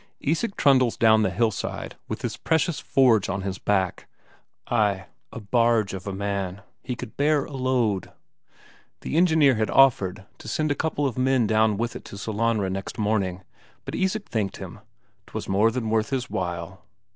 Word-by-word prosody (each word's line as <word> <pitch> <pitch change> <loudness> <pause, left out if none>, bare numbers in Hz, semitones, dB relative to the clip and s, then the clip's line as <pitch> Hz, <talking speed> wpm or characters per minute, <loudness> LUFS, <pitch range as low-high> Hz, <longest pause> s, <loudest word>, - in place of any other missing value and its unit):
Isak 170 +9 -1
trundles 130 -4 +4
down 110 -1 +5
the 100 - +2
hillside 110 +3 -2
with - - -5
his - - -2
precious 160 0 0
forge 120 -7 +3
on 95 0 -2
his 95 -1 -4
back. 95 -3 0 0.6
Ay, 105 -5 +1 0.3
a - - -7
barge 115 -1 +2
of 95 0 -7
a - - -2
man, 100 0 -3 0.2
he 125 - -4
could 120 -2 -9
bear 145 0 +2
a - - -12
load! 125 -7 0 0.9
The - - -4
engineer 160 -5 +5
had 110 -2 0
offered 100 -8 +3
to - - -11
send 155 -1 0
a - - +4
couple 145 0 -1
of 130 -2 -2
men 130 -2 +3
down 110 -1 +2
with 120 +2 -2
it - - -7
to 100 - -9
Sellanraa 110 -2 0
next 95 +4 -5
morning, 100 -4 -1 0.4
but - - -6
Isak 195 +2 -1
thanked 105 -4 -2
him - - -9 0.5
'twas - - -6
more 100 +4 +3
than 115 -2 -3
worth 110 +1 +1
his 130 -2 -3
while. 90 +2 -4
110 Hz, 175 wpm, -25 LUFS, 100-130 Hz, 0.9 s, down